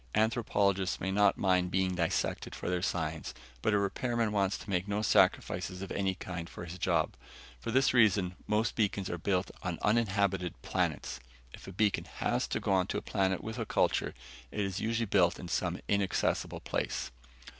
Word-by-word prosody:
Anthropologists 100 -4 +1
may 95 - -1
not 100 0 +4
mind 90 -2 +2
being 95 0 +1
dissected 85 -2 -1
for - - -6
their 90 -1 0
science, 80 -3 -2 0.3
but - - +2
a 105 - +4
repairman 115 +3 0
wants 100 -1 +1
to - - -12
make 95 -1 0
no 105 +1 -1
sacrifices 90 -2 +2
of 95 - -7
any 95 -1 0
kind 90 -2 -6
for 85 - -8
his 90 +2 -8
job. - - +1 0.5
For - - -5
this 130 +3 +3
reason, 100 -6 +4
most 110 +2 +1
beacons 100 -3 0
are 85 - -3
built 95 +2 0
on 90 -2 -3
uninhabited 100 -5 +1
planets. 60 - -1 0.3
If - - -11
a - - -6
beacon 105 +2 +1
has - - -1
to - - -1
go - - -1
on 95 -1 +3
a - - -1
planet 95 -2 0
with 110 +2 -5
a 115 - -1
culture, - - +1 0.3
it 105 - -3
is 95 -1 -2
usually 115 +1 0
built 95 -4 +3
in 90 - -6
some 85 - -1
inaccessible 100 -2 0
place. - - -2
95 Hz, 180 wpm, -31 LUFS, 90-105 Hz, 0.5 s, not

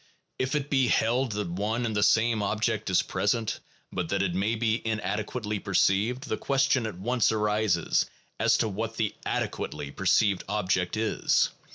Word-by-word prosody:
If 130 +3 0
it 145 -1 -2
be 135 -3 +3
held 120 +1 +1
that 105 -2 -2
one 110 +6 -1
and 110 -2 -2
the 105 - +1
same 115 +1 +3
object 110 +1 -1
is 95 - +3
present, 110 +1 -1 0.3
but 90 -3 -3
that 100 0 +1
it 90 -3 -1
may 100 +5 0
be 115 0 0
inadequately 110 0 -2
perceived, 100 +7 +1
the - - -1
question 135 -3 +1
at 105 - -7
once 120 +5 +1
arises 105 -4 +1 0.3
as - - +4
to - - +1
what 110 +2 -4
the 110 -2 0
adequately 70 - -3
perceived 100 +3 +2
object 95 -2 0
is. 110 -1 +2
110 Hz, 165 wpm, -27 LUFS, 100-115 Hz, 0.3 s, as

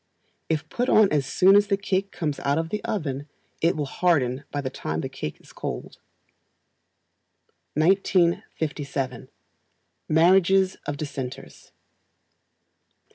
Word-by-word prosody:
If 155 -2 -1
put 245 +1 -1
on 215 -2 +5
as 145 -3 +1
soon 190 +6 +5
as 205 0 +5
the 200 -1 +1
cake 195 0 -1
comes 155 -5 -3
out 140 +1 0
of 165 0 -1
the 210 +3 -3
oven, 150 - -3 0.3
it 165 +2 +3
will 150 - -1
harden 140 -4 +1
by 145 - -3
the 130 -2 -4
time 80 +1 -3
the - - -4
cake 75 - -6
is - - -18
cold. - - -6 1.8
1957. 155 -6 0 0.8
Marriages 185 +3 +4
of 145 - -2
Dissenters. 135 -4 -7
160 Hz, 125 wpm, -25 LUFS, 140-190 Hz, 1.8 s, on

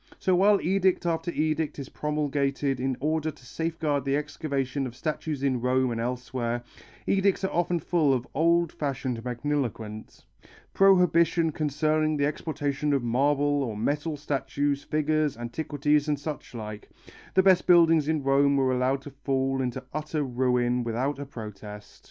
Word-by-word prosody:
So 185 - +1
while 200 +2 +5
edict 190 0 +1
after 165 0 -1
edict 155 -1 -1
is 140 -3 -6
promulgated 140 -2 -1
in 130 0 -1
order 155 +2 0
to 145 -4 -12
safeguard 160 -1 -2
the 135 +1 +1
excavation 140 -3 -2
of 120 - -10
statues 150 0 -3
in 130 -3 +1
Rome 130 0 +2
and 115 -1 -2
elsewhere, 120 -1 -3 0.4
edicts 195 0 +2
often 175 -2 0
full 160 -2 +1
of 125 -2 0
old 170 +2 +2
fashioned 130 -5 -3
magniloquence, 120 -4 -4 0.5
"Prohibition 170 -4 +4
concerning 155 +1 0
the 140 - +2
exportation 145 -1 -2
of 135 -3 +1
marble 145 +4 +2
or 115 -6 -3
metal 145 +7 -1
statues, 140 0 -1
figures, 155 -2 0
antiquities 145 +4 0
and 150 -1 +1
suchlike," 120 -8 -7 0.5
the 190 - +5
best 185 -2 +4
buildings 165 -4 +5
in 155 -2 0
Rome 140 +1 +3
were 130 -1 +2
allowed 130 +2 0
to 145 - -9
fall 135 -1 -1
into 130 0 -3
utter 155 0 -2
ruin 125 -1 +1
without 125 +5 -2
a 140 - -6
protest. 105 -4 -9
145 Hz, 145 wpm, -27 LUFS, 130-155 Hz, 0.5 s, while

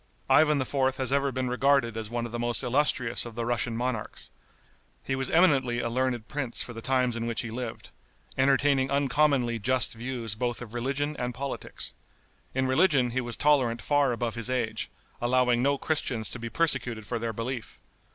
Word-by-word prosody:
Ivan 150 -2 +5
IV. 130 0 +1
has 130 -1 -2
ever 140 0 +2
been 130 0 -2
regarded 125 -2 +2
as 110 -2 -4
one 120 0 -2
of 120 - -7
the 120 - -4
most 120 +2 -1
illustrious 125 -2 +1
of 120 -2 -8
the 120 0 -2
Russian 120 -1 -1
monarchs. 120 -3 -4 0.7
He 135 - -1
was 130 -1 -1
eminently 135 -8 +3
a 115 - -2
learned 125 -2 -1
prince 135 -5 -2
for 120 - -8
the 115 - -7
times 125 -1 +1
in 115 0 -3
which 115 - -1
he 115 - -6
lived, 120 -1 -6 0.4
entertaining 135 0 +3
uncommonly 140 -3 +2
just 130 +4 +3
views 120 -2 -4
both 120 +2 -2
of 120 -2 -9
religion 140 +5 -2
and 125 -1 -3
politics. 140 +2 -4 0.6
In 130 0 +1
religion 130 -2 +3
he 130 +2 0
was 120 -1 -4
tolerant 130 -6 +3
far 145 -1 +2
above 120 -1 -2
his 115 +1 -4
age, 125 -4 -1 0.3
allowing 125 0 +3
no 140 +2 +2
Christians 130 -7 -1
to 125 - -7
be 115 0 -5
persecuted 125 -8 0
for 120 +2 -3
their 115 0 -2
belief. 115 +2 -5
125 Hz, 185 wpm, -28 LUFS, 115-135 Hz, 0.7 s, Ivan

